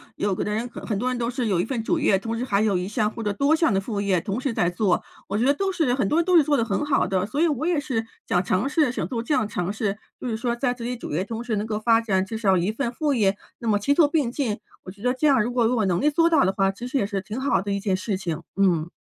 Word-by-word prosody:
有 205 -1 0
的 210 - -2
人 225 +3 -1
很 225 -2 -4
多 245 - -1
人 250 - -2
都 235 0 -1
是 250 -1 -2
有 185 -5 +2
一 185 - -2
份 235 -3 -3
主 330 +8 0
业， 245 -10 +3
同 225 +3 -4
时 245 - -2
还 205 -5 +1
有 210 -4 +2
一 180 +1 -3
项 210 0 0
或 230 - -6
者 205 - 0
多 280 +9 +3
项 325 -6 +2
的 195 - +2
副 200 0 -3
业 195 -3 +2
同 200 +8 -3
时 265 -4 -1
在 175 - +1
做， 180 0 +1 0.3
我 200 - -1
觉 240 - +1
得 280 - +5
都 390 +5 -1
是 320 -9 +1
很 250 -7 0
多 315 - +2
人 340 - +1
都 365 -1 +3
是 325 - +7
做 290 0 +2
得 230 - +1
很 195 +1 -1
好 290 -2 +2
的， 185 -1 0
所 275 +7 -3
以 340 - +5
我 305 +1 -1
也 340 -4 +2
是 255 -6 -2 0.2
想 180 +1 +2
尝 185 +9 0
试 295 -3 +2
想 - - -3
做 235 -3 -3
这 240 +6 -1
样 215 - +2
尝 180 -2 -2
试。 205 -1 -2 0.2
就 - - -5
是 230 - -1
说 235 +1 -1
在 245 0 0
自 245 - -9
己 245 +1 -3
主 - - -7
业 175 +5 0
同 225 +3 -5
时 235 -3 -2
能 210 +1 -2
够 215 -1 -2
发 225 +1 +3
展 190 -4 0
至 220 +3 -5
少 195 -4 +3
1 180 +4 0
份 235 +1 -2
副 295 +3 0
业， 205 -5 +2 0.2
那 235 - -5
么 210 - +3
齐 280 +7 +2
做 310 -1 +5
并 290 -5 0
进， 240 -7 -2 0.2
我 - - -9
觉 200 +2 -15
得 250 0 +2
这 285 +4 +1
样 265 -6 +4
如 240 - -2
果 245 -1 +2
我 235 -2 +1
有 - - +1
能 180 +1 +1
力 300 - +4
做 330 +3 +3
到 310 -4 +4
的 190 - +2
话， 195 -1 +2
其 235 +6 -7
实 270 - -1
也 235 - +1
是 200 -1 -3
挺 215 +5 -6
好 275 +1 +1
的 200 +1 -4
一 200 - 0
件 195 -2 0
事 190 +1 -2
情， 170 -5 -4
嗯。 175 -4 +2
225 Hz, 350 characters per minute, -24 LUFS, 200-265 Hz, 0.3 s, 是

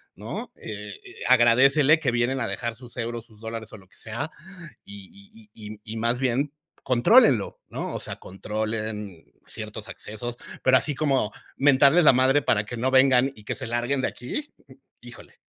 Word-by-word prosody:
¿no? - - -7
Eh, 105 -1 -7 0.4
agradécele 135 +5 +5
que 130 -5 +1
vienen 120 +2 0
a 115 - -1
dejar 120 -1 -4
sus 125 0 -14
euros, 115 -1 -4
sus 110 -3 -20
dólares 110 0 -7
o - - -8
lo 95 -2 -18
que - - -26
sea, 115 +8 -5 0.5
Y 200 - -14
y 110 - -12
y 105 0 -9
y 110 +1 -7
más 120 +2 0
bien, 135 +3 0 0.3
contrólenlo, 130 - +4
¿no? - - -5
O - - -3
sea, - - -6
controlen 105 -1 -5 0.2
ciertos - - -8
accesos, 120 +3 -7 0.3
pero, 130 0 +5
así 145 - -1
como 135 -8 +1 0.3
mentarles 140 +4 +5
la - - +9
madre 130 +3 +3
para 105 -2 +1
que 120 - -7
no 130 +3 0
vengan 130 0 +5
y 105 - -14
que - - -3
se 135 -2 -7
larguen 120 +3 -1
de - - +1
aquí, 290 - -6 0.5
híjole, - - -14
120 Hz, 175 wpm, -25 LUFS, 110-135 Hz, 0.5 s, la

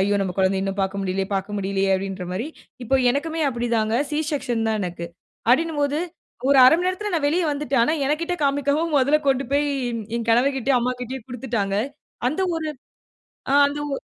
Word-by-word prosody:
"ஐயோ! 200 +2 +2
நம்ப 185 - -2
குழந்தைய 190 0 +2
இன்னும் 195 0 -3
பார்க்க 195 +1 -2
முடியலையே 190 0 -1
பார்க்க 195 +2 -2
முடியலையே" 195 0 0
அப்டின்ற 190 -1 -5
மாரி. 225 +9 -3 0.4
இப்ப 265 +3 +2
எனக்குமே 320 +3 -2
அப்டிதாங்க. 235 -2 0
சி 295 - -1
செக்ஷன் 245 -6 -1
தான் 220 -1 0
எனக்கு. 175 -2 -4 0.5
அப்டின்னுபோது 295 0 +1 0.5
ஒரு 280 -1 +5
1/2 255 - +8
மணி 360 +2 -1
நேரத்தில 390 +2 -3
நான் 310 -4 +1
வெளிய 345 +5 +1
வந்துட்டேன். 280 -4 +1
ஆனா 310 - +1
என்கிட்ட 335 +5 -1
காமிக்காம 285 +3 +1
முதல்ல 280 +3 +3
கொண்டு 270 0 +2
போய் 290 +1 +2 0.5
என் 230 -1 -4
கணவர்கிட்டயும், 265 +2 +3
அம்மாகிட்டயும் 250 0 -4
குடுத்துட்டாங்க. 230 -5 -2 0.5
அந்த 310 +8 -3 0.2
ஒரு 315 -1 -3 0.8
அ - - +4
அந்த 285 +1 -3
ஒ - - +1
255 Hz, 170 wpm, -23 LUFS, 205-290 Hz, 0.8 s, 1/2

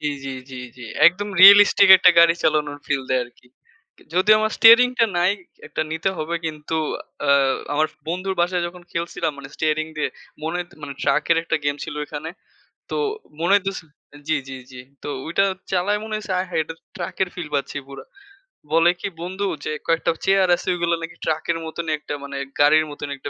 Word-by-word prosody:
জ্বী, 150 -1 -1
জ্বী, 135 - -4 0.2
জ্বী, 130 -1 -7 0.2
জ্বী। 120 -2 -10 0.2
একদম 200 +4 +2
রিয়ালিস্টিক 200 0 +8
একটা 180 -1 +6
গাড়ি 170 0 +6
চালানোর 150 -2 0
ফিল 140 -2 -1
দেয় 130 -1 +2
আরকি। 120 0 -21 0.7
যদিও 210 +4 +5
আমার 220 0 0
স্টিয়ারিং 230 +2 +8
টা 230 - +5
নাই। 180 +3 +3 0.3
১ - - -19
টা - - +2
নিতে 160 +4 -1
হবে 160 +2 -3
কিন্তু 155 +1 -4 0.5
আ - - +5 0.4
আমার 155 +1 +2 0.2
বন্ধুর 185 +3 -2
বাসায় 175 0 0
যখন 180 +1 -10
খেলছিলাম 170 -1 -2
মানে 135 -1 -9
স্টিয়ারিং 155 0 -1
দিয়ে। 150 - -1 0.3
মনে 165 +2 -2
হইত 175 0 -6
মানে 140 - -6
ট্রাকের 145 +4 +2
একটা 160 - -1
গেম 145 0 0
ছিল - - -7
এখানে। 155 +2 -6 0.6
তো - - -2 0.4
মনে 175 +3 +1
হইতেছে 195 -3 -1 0.4
জ্বী, 160 - +2
জ্বী, 135 - -7
জ্বী। 125 -1 -10 0.2
তো - - -6 0.2
ওইটা 170 +4 +1 0.3
চালায় 200 +3 +1
মনে 220 - -5
হইছে 210 -2 -5
আয় 185 - -2
হায়! 165 -2 0
এটাতো 165 +1 -11
ট্রাকের 190 - -3
ফিল 170 -4 -6
পাচ্ছি 140 +1 -2
পুরা। 140 - -10 0.7
বলে 165 +1 +5
কি - - -3
বন্ধু 190 +3 -4 0.2
যে - - -2 0.2
কয়েকটা 165 0 +1
চেয়ার 195 -1 +3
আছে, - - -11
ওইগুলো 170 -1 0
নাকি 165 0 -7
ট্রাকের 160 +1 -1
মতনই 160 0 -4
একটা 150 - -7
মানে 140 0 -7 0.2
গাড়ির 155 +2 +5
মতন 145 0 -7
একটা 145 - -7
165 Hz, 190 wpm, -22 LUFS, 150-185 Hz, 0.7 s, রিয়ালিস্টিক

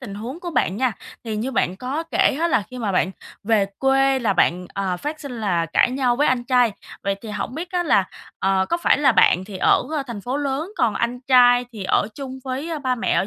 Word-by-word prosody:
tình 215 -6 -8
huống 245 +11 -7
của 350 - -5
bạn 200 - 0
nha. 255 -1 +1 0.3
Thì 220 -2 -3
như 230 +5 -2
bạn 185 -5 0
có 265 +8 -3
kể 280 - +2
á 340 - +2
là 215 - +2
khi 255 - -8
mà 210 -4 -2
bạn 185 +1 +1 0.3
về 210 -2 +2
quê 270 0 +3
là 220 -5 +1
bạn, 180 0 +1
ờ, 190 -2 -1
phát 300 - -5
sinh 250 -6 -7
là 175 -5 0
cãi 165 - +2
nhau 255 -2 +1
với 295 +3 +2
anh 245 -1 +1
trai, 245 -3 +3 0.3
vậy 200 0 0
thì 225 - -8
hổng 210 +4 -4
biết 340 +3 -5
á 355 -1 +1
là, 200 - +3 0.3
ờ, 190 0 +1
có 340 - +1
phải 340 - +2
là 270 -4 +4
bạn 185 -3 +4
thì 195 -1 -8
ở - - +3 0.2
thành 230 -4 -6
phố 250 +6 -3
lớn, 290 +6 -2
còn 225 -3 +1
anh 240 +1 -2
trai 245 -1 +5
thì 210 -4 -7
ở 200 - +1
chung 265 -2 -7
với 280 +5 -3
ba 255 - +2
mẹ 235 - -1
ở - - +2
245 Hz, 245 wpm, -22 LUFS, 205-270 Hz, 0.3 s, trai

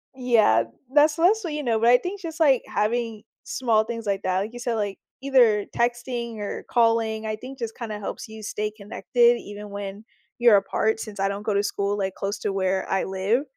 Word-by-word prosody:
Yeah. 225 - +4 0.3
That's 300 +1 +5
mostly 360 -2 +2
you 295 - -3
know, 230 -4 +1
but 230 +1 +4
I 245 - +8
think 380 +7 -6
just, 330 -1 -7
like, 275 -6 +4
having 225 0 -1 0.2
small 225 -4 +1
things 230 0 -6
like 200 -1 -1
that, 185 0 +1
like 215 +4 -4
you 245 - -8
said, 240 -1 -1
like, 205 -3 -2 0.2
either 240 -7 +4
texting 240 -1 -1
or 205 -1 -5
calling, 225 -2 +2
I 215 0 -2
think 255 +4 -10
just 230 -1 -5
kinda 215 -4 -5
helps 205 - -6
you 220 0 -10
stay 210 +1 -3
connected 235 +3 +2
even 205 0 -9
when 200 +1 -7 0.3
you're 235 -4 +7
apart 220 +3 0
since 210 -3 -7
I 195 - +2
don't 200 +1 -4
go 210 - 0
to 200 - +2
school, 205 0 -1
like, 190 -2 -2
close 200 +1 -3
to 205 - -2
where 190 0 0
I 195 - +1
live. 195 +8 0
220 Hz, 210 wpm, -24 LUFS, 205-245 Hz, 0.3 s, I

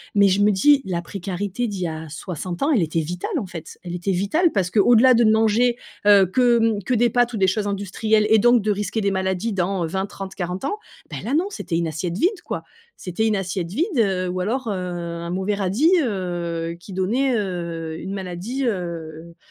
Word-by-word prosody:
Mais 200 -1 +6
je 195 +1 +2
me 210 +1 +5
dis 280 +8 +4
la 175 -2 -2
précarité 195 +5 -3
d'il 200 -3 -5
y - - 0
a 160 0 -6
60 175 - -5
ans, 305 - +2
elle 230 -10 +3
était 165 0 0
vitale, 180 - -3
en 230 - -2
fait. 165 -3 -9
Elle 175 -1 -6
était 180 +2 -2
vitale 215 - +2
parce 185 -3 0
qu'au-delà 240 +4 +6
de 235 - +4
ne 215 - +5
manger, 225 +2 +3 0.3
heu, 200 -2 +7
que, 240 +5 +3 0.2
mmh, 200 - -6
que 255 - -1
des 240 +1 +3
pâtes 245 0 +2
ou - - -2
des 190 -2 +3
choses 205 +2 0
industrielles 205 +2 +1
et 220 - +7
donc 240 0 +4
de 215 - +1
risquer 210 +2 -2
des 200 - +1
maladies 190 +3 -1
dans 185 -1 0
20, 190 +4 -2
30, 195 -1 -8
40 180 +6 -4
ans, 415 - -2 0.3
beh, - - -4
là, 255 +5 -1
non, 340 +5 +2
c'était 195 - -4
une 170 -1 0
assiette 170 +3 -3
vide, 360 - +1
quoi. - - -4 0.4
C'était 190 +5 -1
une 215 - +2
assiette 185 -2 -3
vide, 285 - 0
heu, 190 -5 +1
ou 180 +1 -3
alors, 235 +7 -2
heu, - - 0
un 175 -2 -4
mauvais 190 +3 -1
radis, 205 - +2
heu, 175 - -3
qui 190 - -11
donnait, 240 +8 +1
heu, 170 -5 -4
une 190 +2 -5
maladie, 195 +8 -4
heu, 170 -5 -4
195 Hz, 220 wpm, -22 LUFS, 175-225 Hz, 0.4 s, heu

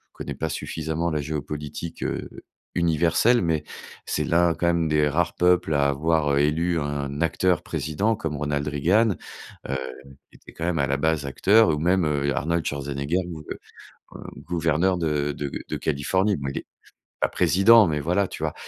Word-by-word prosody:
connais - - -6
pas 80 - -3
suffisamment 80 +3 -3
la 75 -1 -1
géopolitique, 75 +2 -5
heu, - - -3 0.5
universelle, 85 +8 +3
mais 80 -3 0 0.4
c'est - - -1
l'un, 85 0 +3
quand 85 +3 -1
même, 85 -1 +2
des 75 -1 +2
rares 85 +3 0
peuples 90 -2 +2
à 70 0 +3
avoir, 75 +1 +1
heu, - - +2
élu 80 +4 +1
un 70 -1 -3
acteur 90 +1 +1
président 100 +10 -1
comme 80 -6 -4
Ronald 75 0 -2
Reagan, 95 +9 +2 0.5
heu, 70 - 0 0.5
qui - - -21
était - - -15
quand 80 - -4
même 85 -1 0
à 70 - +2
la 70 +1 0
base 80 0 0
acteur, 100 +9 +4
ou 75 -2 0
même, 90 +2 +2
heu, 70 -2 0
Arnold 85 +2 0
Schwarzenegger 70 +5 -2
gouve 80 -4 -8
heu, - - -4 0.9
gouverneur 85 +2 +1
de 75 -3 0
de 70 0 -4 0.2
de - - -3
Californie. 95 +8 0
Bon 70 -1 -5
il - - -3
est - - -11 0.6
pas - - +3
président, 110 +4 +5
mais 75 -2 -1
voilà, 90 +6 +1
tu - - -8
vois? - - -1
80 Hz, 175 wpm, -24 LUFS, 75-85 Hz, 0.9 s, président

